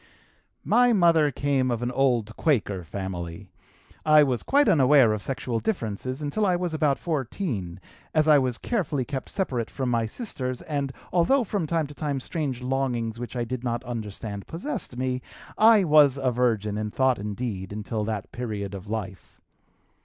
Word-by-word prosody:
"My 245 0 +4
mother 165 -6 +4
came 140 -1 0
of 120 -1 -1
an 120 - -1
old 125 -5 +1
Quaker 105 - 0
family. 90 0 -6 0.5
I 155 -1 +6
was 130 -4 0
quite 285 +1 +3
unaware 135 -5 +5
of 105 - -3
sexual 125 0 -2
differences 130 - -3
until 150 +9 -1
I 185 -3 +3
was 175 -2 -2
about 150 -3 +2
14, 130 - -3 0.3
as 155 0 +2
I 150 -2 +7
was 125 -3 -1
carefully 155 - -1
kept 135 -1 -5
separate 130 - -2
from 130 -2 -3
my 115 -1 +1
sisters 130 - -4
and, 140 -3 -2 0.2
although 240 +10 +3
from 195 -6 -2
time 165 0 0
to 145 - -10
time 145 -2 -2
strange 135 -3 -3
longings 125 -4 -1
which 120 0 -6
I 120 - 0
did 125 +1 -4
not 120 0 -2
understand 105 -4 -6
possessed 170 - -5
me, 130 0 -1 0.3
I 220 -2 +6
was 150 -4 +5
a 130 -2 +1
virgin 110 -4 0
in 105 0 -2
thought 130 +1 +2
and 105 0 -4
deed 100 -5 -4
until 105 +1 -3
that 105 -3 -4
period 105 -5 -4
of 100 +1 -8
life. 105 -3 -6
130 Hz, 170 wpm, -26 LUFS, 110-150 Hz, 0.5 s, I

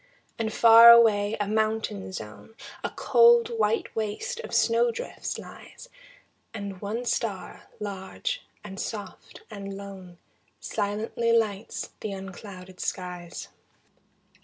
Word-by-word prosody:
And 220 -1 -1
far 230 +1 +9
away 220 -3 +6
a 205 - -1
mountain 215 - -1
zone, 105 - -9 0.3
A - - -1
cold, 470 -1 +5
white 455 -4 -1
waste 225 - -3
of 475 - -7
snow 235 +1 +3
drifts 230 - -5
lies, - - -12 0.7
And 200 -3 -6
one 220 +4 -3
star, 220 -5 -3
large 210 - -4 0.2
and 195 -1 -8
soft 205 -4 -7
and 200 -2 -7
lone, 190 -3 -10 0.4
Silently 220 +3 -2
lights 220 -2 -1
the 210 - -4
unclouded 190 -1 -10
skies. 180 -2 -5
210 Hz, 110 wpm, -26 LUFS, 195-230 Hz, 0.7 s, far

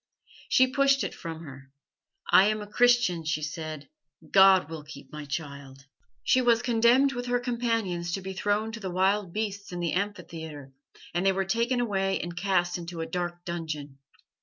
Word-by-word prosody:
"She 260 - +6
pushed 275 +1 +2
it - - -3
from 165 -1 -7
her. 135 -3 -11 0.6
'I 190 - +8
am 215 0 0
a 205 - -13
Christian,' 240 -8 +3
she 155 -1 -2
said. 155 -1 -5 0.4
'God 190 -4 +6
will 160 -1 -7
keep 150 - -12
my 150 -1 -7
child.' 140 -2 -7 0.4
"She 255 - +3
was 235 -1 +3
condemned 240 +3 +4
with 245 0 -4
her 245 0 +1
companions 230 -8 -1
to 195 - -2
be 190 +1 -6
thrown 205 +3 0
to 230 - -7
the 190 -3 -4
wild 190 +1 +1
beasts 200 -1 -4
in 175 - -5
the 170 -2 -1
amphitheatre, 160 -8 -5 0.4
and 175 +1 0
they 195 - +4
were 190 0 -1
taken 235 +5 0
away 195 -5 0
and 175 0 -5
cast 180 -1 0
into 170 -1 -6
a - - -2
dark 175 +1 -4
dungeon. 155 -5 -5
185 Hz, 180 wpm, -27 LUFS, 165-225 Hz, 0.6 s, I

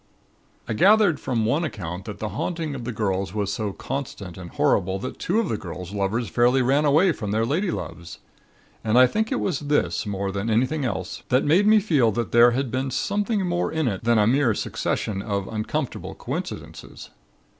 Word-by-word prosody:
"I - - -1
gathered 200 - +4
from 115 -4 -1
one 145 +9 +1
account 90 - -5
that 105 -3 -7
the 110 - -4
haunting 160 - -3
of 125 -4 -6
the 125 - -2
girls 100 -3 -2
was 100 -1 -1
so 105 -2 -2
constant 125 -7 -6
and 90 -2 -9
horrible 95 +2 +1
that 130 +7 -6
two 200 +6 +1
of 230 - 0
the 110 - -2
girls' 90 +1 -7
lovers 105 +4 -1
fairly 125 +2 +3
ran 140 +4 +2
away 160 +6 +4
from 105 -9 -5
their 110 +2 +1
ladyloves. 115 - -3 0.7
And 110 +2 +2
I 130 - +9
think 220 - -1
it 260 - 0
was 175 -8 -1
this, 145 -6 0
more 100 -1 -2
than 100 +3 -3
anything 130 +6 +1
else, 95 -6 -4
that 130 +1 +3
made 180 +8 +4
me 215 0 +7
feel 150 - +2
that 120 +2 -2
there 120 +1 +7
had 125 0 -1
been 130 +1 -1
something 205 - -1
more 175 0 -1
in 160 -3 0
it 100 -5 -2
than 120 0 +3
a 105 - +4
mere 120 -1 +3
succession 100 -1 -2
of 100 -2 -3
uncomfortable 115 +6 -4
coincidences. - - -7
120 Hz, 195 wpm, -24 LUFS, 105-150 Hz, 0.7 s, I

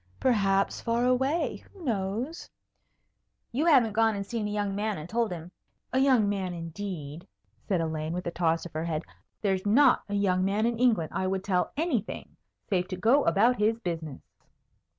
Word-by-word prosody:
"Perhaps 195 -5 +2
far 235 +1 0
away. 265 +6 +1
Who 385 -4 -14
knows?" 230 - -3 1.0
"You 285 +8 0
haven't 250 -9 +5
gone 225 0 +3
and 200 0 -4
seen 215 0 -3
a - - -3
young 205 -1 -1
man 210 0 -1
and 155 +1 -7
told 230 0 0
him 170 0 -7 0.2
" - - -45
"A 260 - +3
young 260 -6 +4
man, 190 -3 -2
indeed!" 165 -2 -6 0.4
said 185 -4 +1
Elaine, 160 -1 -2
with 180 +2 -4
a 170 - -2
toss 165 -1 0
of 175 - -9
her 160 +1 -2
head. 160 -1 -2 0.4
"There's 190 -2 +1
not 250 +6 +5
a 205 - -2
young 185 -2 +2
man 200 +3 +1
in 235 -1 -1
England 220 -11 +2
I 185 - -1
would 190 0 -1
tell 185 -3 0
anything 300 - -2 0.3
save 185 -2 0
to 185 - -4
go 240 +9 +3
about 235 +5 +3
his 220 +2 +2
business." 165 - -5
205 Hz, 185 wpm, -28 LUFS, 180-235 Hz, 1.0 s, haven't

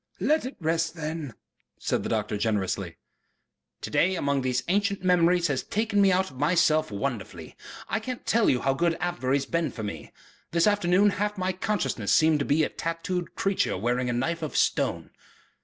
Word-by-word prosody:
"Let 310 -3 +2
it 265 - -8
rest 165 0 0
then," 155 -6 -5 0.4
said - - -1
the - - -4
doctor - - -1
generously. 100 -4 -1 0.8
"To - - -6
day, 185 +2 +2
among 140 -4 0
these 125 -1 -1
ancient 200 +1 0
memories, 180 -1 +3
has 140 -6 0
taken 210 -1 0
me 195 -1 +5
out 185 -2 +1
of 130 - -13
myself 155 0 +3
wonderfully. 105 0 -5 0.3
I 220 - -1
can't 245 +2 -6
tell 230 -1 +3
you 125 - +2
how 135 - +2
good 165 +3 0
Avebury 160 -6 0
has 140 - -3
been 170 -1 -1
for 110 - -7
me. 80 -8 -6 0.4
This 170 0 +3
afternoon 205 0 +3
half 210 +1 -2
my 185 0 -1
consciousness 175 - -2
has - - +6
seemed 155 -1 +4
to 140 - -1
be 155 +2 +2
a - - 0
tattooed 165 +2 -4
creature 195 - 0
wearing 120 +4 0
a - - 0
knife 165 +8 -1
of 155 - -3
stone...." - - 0
165 Hz, 190 wpm, -26 LUFS, 130-185 Hz, 0.8 s, has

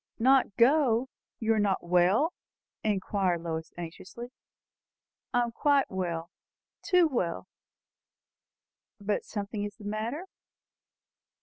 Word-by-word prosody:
"Not 255 -3 +4
go? 255 -1 +4 0.3
You 225 -1 +2
are 220 - +1
not 200 -2 +1
well?" 180 - +3 0.5
inquired 190 -4 0
Lois 160 -1 -4
anxiously. 185 +8 -8 1.0
"I 245 - +3
am 235 - -3
quite 280 +3 +2
well 170 -2 -3 0.5
too 360 -3 +4
well!" 185 - -2 1.5
"But 205 0 -1
something 205 0 -4
is 205 0 -5
the 210 -1 -13
matter?" 225 - -3
210 Hz, 105 wpm, -29 LUFS, 185-245 Hz, 1.5 s, Not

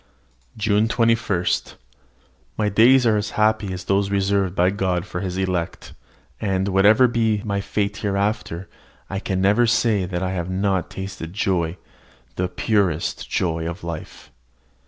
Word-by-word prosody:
JUNE 105 0 +2
21. 115 -6 +1 1.1
My 105 -1 +1
days 120 +5 +5
are 110 -2 +4
as 105 0 -2
happy 110 -2 +2
as 90 0 -5
those 100 0 +1
reserved 100 -1 +1
by 90 +1 +3
God 95 -3 -1
for 90 - -5
his 95 -2 -3
elect; 90 -3 -3 0.5
and, 95 -1 0
whatever 105 +6 +5
be 110 -3 0
my 100 -1 -1
fate 100 0 -2
hereafter, 100 -3 -2 0.4
I 95 - -2
can 95 -2 -2
never 105 +5 +4
say 110 -4 +2
that 90 0 -3
I 95 - -1
have 90 -1 -3
not 95 -1 0
tasted 95 -3 -7
joy, 90 -4 0 0.6
the 90 - -1
purest 90 -3 -1
joy 80 -1 -1
of 85 - -8
life. 85 -2 -8
100 Hz, 145 wpm, -22 LUFS, 90-105 Hz, 1.1 s, days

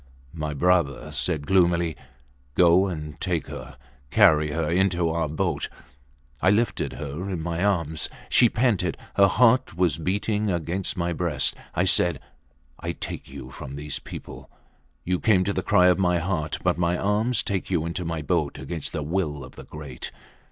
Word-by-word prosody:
My 75 -2 -4
brother 75 -3 +1
said 75 +1 0
gloomily, 85 -2 +3 0.6
Go 90 +2 +5
and 75 -4 -6
take 85 -3 -1
her; 70 -2 -9 0.3
carry 75 -4 +5
her 80 +1 -1
into 90 0 +2
our 80 -1 -1
boat. 75 - -1 0.7
I 95 - +4
lifted 105 - +1
her 75 +8 -5
in 90 -3 -2
my 85 +1 -2
arms. 85 -6 0 0.2
She 120 - +5
panted. 105 -8 +1 0.2
Her 100 - +6
heart 115 -2 +3
was 85 -4 +2
beating 105 +4 0
against 90 +2 -2
my 85 0 0
breast. 80 -5 +1 0.2
I - - +2
said, 85 -6 +3 0.6
I 85 +1 -3
take - - -7
you 65 -1 -9
from 65 +1 -8
those 75 0 -4
people. - - -10 0.5
You 90 0 0
came 95 -5 +4
to 100 +2 -1
the 95 - -1
cry 90 -2 +4
of 90 +1 +4
my 90 -2 +3
heart, 85 -3 -2
but - - +1
my 85 0 +1
arms 105 +6 +1
take 95 -2 -2
you 85 -4 0
into 85 +2 -3
my 80 -2 -3
boat 75 -2 0
against 75 +3 -4
the 75 - -2
will 75 -3 -2
of 65 - -12
the - - -10
great! 75 -5 -8
85 Hz, 170 wpm, -25 LUFS, 75-95 Hz, 0.7 s, Her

